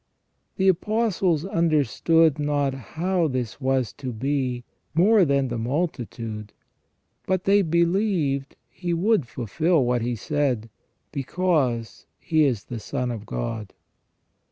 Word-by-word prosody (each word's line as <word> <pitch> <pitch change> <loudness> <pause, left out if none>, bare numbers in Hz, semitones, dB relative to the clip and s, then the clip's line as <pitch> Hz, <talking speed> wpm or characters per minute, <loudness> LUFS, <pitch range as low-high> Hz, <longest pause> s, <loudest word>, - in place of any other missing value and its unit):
The 190 - +2
Apostles 190 -3 +1
under 165 -6 +2
stood 160 +4 +3
not 145 -2 0
how 170 +6 -1
this 130 -2 -3
was 130 -4 0
to 130 -3 -4
be 130 +1 -1 0.3
more 195 +3 +5
than 140 -3 +1
the 120 -1 -3
multitude, 115 -6 -3 0.7
but 185 -1 +1
they 200 +1 +4
believed 170 -5 +1
He 175 -1 -3
would 185 - +2
fulfil 140 - +1
what 120 0 +1
He 120 +1 -1
said, 125 -4 -1 0.4
because 140 -6 -1
He 155 -2 +2
is 120 -7 0
the 120 - -6
Son 125 +2 -3
of 110 -3 -7
God. 95 - -4
145 Hz, 125 wpm, -24 LUFS, 125-170 Hz, 0.7 s, more